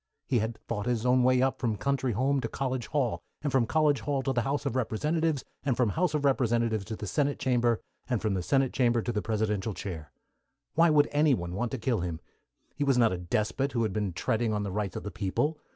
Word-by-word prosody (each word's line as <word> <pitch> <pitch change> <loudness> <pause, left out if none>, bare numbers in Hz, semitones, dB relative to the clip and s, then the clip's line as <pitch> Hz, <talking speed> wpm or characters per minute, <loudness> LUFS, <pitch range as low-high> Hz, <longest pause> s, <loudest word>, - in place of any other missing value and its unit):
He 125 - +1
had 110 +1 -2
fought 105 +3 -3
his 120 -1 0
own 125 0 +4
way 130 0 +4
up 135 - 0
from 115 -3 0
country 135 -2 0
home 135 +5 +1
to - - -2
college 130 -3 -3
hall, 140 -6 0 0.2
and 145 - 0
from 125 -3 +2
college 150 -1 +3
hall 140 -2 -1
to 135 - 0
the 120 - +1
House 140 +5 -2
of - - -1
Representatives, 150 +5 0 0.2
and 130 -5 0
from 125 -4 +3
House 160 - 0
of 145 -1 0
Representatives 115 -5 +1
to 110 - -5
the 105 - -6
Senate 145 +6 0
Chamber, 120 -3 +2 0.3
and 120 -3 +1
from 105 -1 0
the 95 - -1
Senate 135 +6 +1
Chamber 120 -3 +2
to 120 - -1
the 105 -2 -1
Presidential 105 -2 -1
chair. 80 -7 -6 0.6
Why 165 +1 +5
should 150 -1 +5
anyone 135 - +2
want 120 +5 -1
to - - -1
kill 120 0 0
him? 85 -2 -3 0.5
He 145 - -2
was 135 -3 +3
not 115 -5 +4
a - - -2
despot 110 +9 -1
who 115 -2 +1
had 110 -4 -1
been 105 -3 -1
treading 110 +6 0
on 105 -1 -1
the 100 - -3
rights 100 -2 -2
of - - -5
the 105 - -5
people. 145 +10 -1
120 Hz, 235 wpm, -29 LUFS, 105-135 Hz, 0.6 s, Why